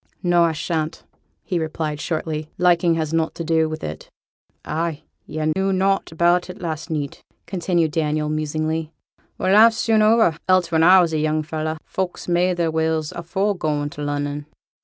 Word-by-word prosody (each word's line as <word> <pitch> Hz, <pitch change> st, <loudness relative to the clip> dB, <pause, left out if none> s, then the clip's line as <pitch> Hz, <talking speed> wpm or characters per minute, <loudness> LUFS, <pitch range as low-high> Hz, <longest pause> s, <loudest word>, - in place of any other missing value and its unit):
'No, 175 Hz, -1 st, +4 dB
I 165 Hz, -, +1 dB
shan't,' 160 Hz, 0 st, -3 dB, 0.4 s
he 180 Hz, -4 st, -1 dB
replied, 155 Hz, -2 st, -3 dB
shortly. 155 Hz, -2 st, -3 dB
'Liking 175 Hz, -1 st, +3 dB
has 160 Hz, -1 st, -2 dB
nought 165 Hz, -1 st, 0 dB
to 170 Hz, -, -4 dB
do 160 Hz, -1 st, +2 dB
with 155 Hz, 0 st, -6 dB
it.' 75 Hz, +1 st, -6 dB, 0.6 s
'Ah' 160 Hz, 0 st, -2 dB, 0.3 s
yo' 155 Hz, 0 st, -1 dB
knew 195 Hz, 0 st, +1 dB
nought 195 Hz, 0 st, +1 dB
about 175 Hz, +2 st, +2 dB
it 180 Hz, -, -8 dB
last 160 Hz, -1 st, -4 dB
neet,' 150 Hz, -3 st, -4 dB, 0.2 s
continued 170 Hz, -3 st, 0 dB
Daniel, 155 Hz, -1 st, 0 dB
musingly. 155 Hz, +1 st, -2 dB, 0.5 s
'Well, 185 Hz, -, +1 dB
life's 225 Hz, +2 st, +7 dB
soon 220 Hz, -1 st, +2 dB
o'er; 215 Hz, -7 st, +4 dB
else 185 Hz, -2 st, +3 dB
when 160 Hz, -1 st, +3 dB
I 185 Hz, +3 st, +7 dB
were -, -, +4 dB
a -, -, -4 dB
young 155 Hz, 0 st, 0 dB
fellow, 155 Hz, +1 st, -3 dB
folks 185 Hz, -2 st, -4 dB
made 175 Hz, +1 st, +2 dB
their 165 Hz, -2 st, +1 dB
wills 160 Hz, -1 st, 0 dB
afore 190 Hz, +4 st, -1 dB
goin' 150 Hz, -4 st, -2 dB
to 150 Hz, -, -8 dB
Lunnon.' 145 Hz, 0 st, -3 dB
160 Hz, 175 wpm, -22 LUFS, 155-180 Hz, 0.6 s, life's